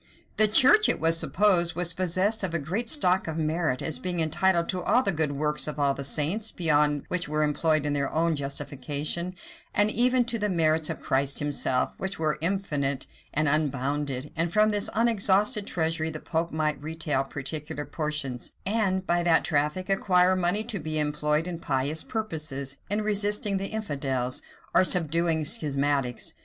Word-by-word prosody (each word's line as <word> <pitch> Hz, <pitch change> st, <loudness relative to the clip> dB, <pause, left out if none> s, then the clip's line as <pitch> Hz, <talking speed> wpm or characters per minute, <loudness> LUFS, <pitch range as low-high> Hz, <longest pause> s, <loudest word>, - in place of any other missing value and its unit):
The 215 Hz, -, +5 dB
church, 275 Hz, -, +5 dB
it -, -, +2 dB
was 165 Hz, +1 st, +4 dB
supposed, 180 Hz, -4 st, +2 dB
was 175 Hz, 0 st, -2 dB
possessed 185 Hz, +5 st, 0 dB
of 180 Hz, -4 st, -2 dB
a -, -, +3 dB
great 185 Hz, +11 st, -3 dB
stock 190 Hz, -, +2 dB
of 160 Hz, 0 st, -4 dB
merit, 155 Hz, -4 st, -1 dB
as 160 Hz, -, -2 dB
being 180 Hz, -1 st, -3 dB
entitled 170 Hz, +2 st, +1 dB
to 185 Hz, -1 st, -1 dB
all 250 Hz, +8 st, +2 dB
the 195 Hz, -, +4 dB
good 155 Hz, -4 st, -1 dB
works 150 Hz, +2 st, 0 dB
of 150 Hz, -1 st, -4 dB
all 140 Hz, -1 st, +2 dB
the 140 Hz, -, -6 dB
saints, 160 Hz, +10 st, 0 dB
beyond 150 Hz, -3 st, +2 dB
what 180 Hz, -1 st, -1 dB
were 155 Hz, +1 st, 0 dB
employed 155 Hz, 0 st, +1 dB
in 145 Hz, -, 0 dB
their 140 Hz, -1 st, -1 dB
own 165 Hz, +1 st, +1 dB
justification; 145 Hz, +5 st, -3 dB, 0.4 s
and 205 Hz, +1 st, +3 dB
even 250 Hz, +2 st, +2 dB
to 235 Hz, -1 st, -2 dB
the 210 Hz, 0 st, -1 dB
merits 160 Hz, -3 st, +1 dB
of -, -, -5 dB
Christ 135 Hz, +1 st, 0 dB
himself, 140 Hz, -3 st, 0 dB
which 190 Hz, +1 st, -4 dB
were 155 Hz, -2 st, -1 dB
infinite 150 Hz, -7 st, -1 dB, 0.3 s
and 155 Hz, +1 st, +2 dB
unbounded; 140 Hz, -1 st, -1 dB
and 165 Hz, +1 st, 0 dB
from 215 Hz, +2 st, +3 dB
this 205 Hz, -1 st, +1 dB
unexhausted 210 Hz, -1 st, +3 dB
treasury 160 Hz, -1 st, -1 dB
the 155 Hz, -1 st, -6 dB
pope 165 Hz, +1 st, -2 dB
might 155 Hz, -1 st, -1 dB
retail 155 Hz, -3 st, -1 dB
particular 145 Hz, +2 st, -5 dB
portions, 150 Hz, -6 st, -4 dB
and 195 Hz, -3 st, 0 dB
by 175 Hz, 0 st, +1 dB
that 170 Hz, -1 st, +3 dB
traffic 150 Hz, +3 st, 0 dB
acquire 185 Hz, -2 st, +3 dB
money 185 Hz, +4 st, +1 dB
to 220 Hz, -3 st, -4 dB
be 155 Hz, 0 st, -4 dB
employed 150 Hz, +2 st, 0 dB
in 170 Hz, -2 st, -5 dB
pious 145 Hz, +1 st, -1 dB
purposes, 155 Hz, -10 st, -4 dB
in 210 Hz, +2 st, 0 dB
resisting 205 Hz, -1 st, +1 dB
the 195 Hz, +1 st, -3 dB
infidels, 135 Hz, -, -2 dB, 0.3 s
or -, -, +5 dB
subduing 165 Hz, -2 st, +1 dB
schismatics. 140 Hz, -, 0 dB
160 Hz, 170 wpm, -26 LUFS, 150-190 Hz, 0.4 s, The